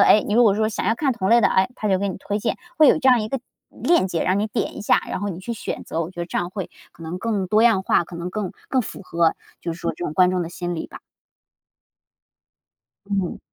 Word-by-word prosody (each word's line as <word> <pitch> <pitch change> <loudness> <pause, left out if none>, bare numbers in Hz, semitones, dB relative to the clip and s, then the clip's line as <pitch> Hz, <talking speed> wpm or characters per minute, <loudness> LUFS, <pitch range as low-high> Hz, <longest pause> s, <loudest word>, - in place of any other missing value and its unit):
哎， 210 - +6
你 205 - -2
如 240 +2 +5
果 205 -4 +5
说 215 +1 +1
想 - - -3
要 225 - +3
看 270 0 +1
同 190 -4 -2
类 235 0 +5
的， - - +5
哎， 190 +3 +2
它 215 - -4
就 190 -2 +3
给 200 0 -1
你 185 - -4
推 205 +1 -3
荐。 - - -1 0.2
会 305 - +8
有 - - +6
这 265 -4 +2
样 250 -3 +6
一 215 - -4
个 270 -1 -2 0.3
链 340 - +2
接， 170 -3 -1
让 185 +2 +1
你 210 - 0
点 210 - -3
一 - - -6
下， - - +3
然 - - -2
后 205 +1 -3
你 180 -1 -5
去 235 +5 -4
选 225 - -5
择， 165 - -3
我 170 +2 -4
觉 175 - -7
得 170 - -3
这 - - -2
样 175 0 -2
会 190 -1 -6 0.2
可 - - -14
能 165 +3 -5
更 200 -4 -1
多 215 +2 +4
样 220 -5 +4
化， 175 - +2
可 175 - -12
能 170 +1 -5
更 205 -3 -3 0.2
更 260 - +2
符 205 - -7
合， 170 -3 +1 0.3
就 170 - -3
是 170 - -10
说 - - -1
这 175 - -5
种 150 - -4
观 180 +2 +5
众 180 -1 0
的 165 - -5
心 175 0 -4
理 - - -4
吧。 - - -12 2.1
嗯。 195 -3 -2
195 Hz, 295 characters per minute, -22 LUFS, 175-220 Hz, 2.1 s, 会